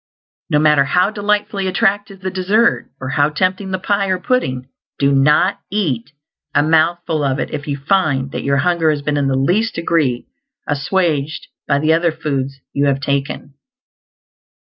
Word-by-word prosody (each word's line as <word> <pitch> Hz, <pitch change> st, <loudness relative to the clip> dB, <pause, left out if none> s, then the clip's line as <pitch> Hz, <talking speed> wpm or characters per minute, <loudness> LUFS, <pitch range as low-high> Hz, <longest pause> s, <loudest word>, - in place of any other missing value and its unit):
No 150 Hz, -, +2 dB
matter 150 Hz, -2 st, +4 dB
how 180 Hz, +8 st, +2 dB
delightfully 205 Hz, -2 st, -1 dB
attractive 195 Hz, 0 st, 0 dB
the 190 Hz, 0 st, -3 dB
dessert, 200 Hz, +5 st, +1 dB
or 130 Hz, -, -5 dB
how 145 Hz, +2 st, +2 dB
tempting 185 Hz, +5 st, -1 dB
the 190 Hz, -, -1 dB
pie 200 Hz, +1 st, 0 dB
or 185 Hz, -1 st, +1 dB
pudding, 130 Hz, -, -1 dB, 0.3 s
do 140 Hz, 0 st, +2 dB
not 140 Hz, +2 st, +3 dB
eat 150 Hz, -, -2 dB, 0.4 s
a 145 Hz, -, +4 dB
mouthful 160 Hz, 0 st, +1 dB
of 135 Hz, -1 st, 0 dB
it -, -, -3 dB
if 150 Hz, -1 st, -5 dB
you 140 Hz, -1 st, -2 dB
find 140 Hz, -4 st, 0 dB
that -, -, -4 dB
your 140 Hz, 0 st, +1 dB
hunger 170 Hz, +1 st, +2 dB
has 150 Hz, -2 st, -1 dB
been 150 Hz, 0 st, -1 dB
in 140 Hz, -1 st, +1 dB
the 135 Hz, -, +1 dB
least 205 Hz, +11 st, +1 dB
degree 155 Hz, -7 st, 0 dB, 0.4 s
assuaged 155 Hz, -1 st, -1 dB, 0.2 s
by 140 Hz, -, +2 dB
the 155 Hz, +2 st, +2 dB
other 170 Hz, +1 st, +2 dB
foods 140 Hz, -4 st, -3 dB, 0.2 s
you 140 Hz, 0 st, +1 dB
have 135 Hz, -1 st, +1 dB
taken. 140 Hz, 0 st, -3 dB
155 Hz, 165 wpm, -18 LUFS, 140-185 Hz, 0.4 s, matter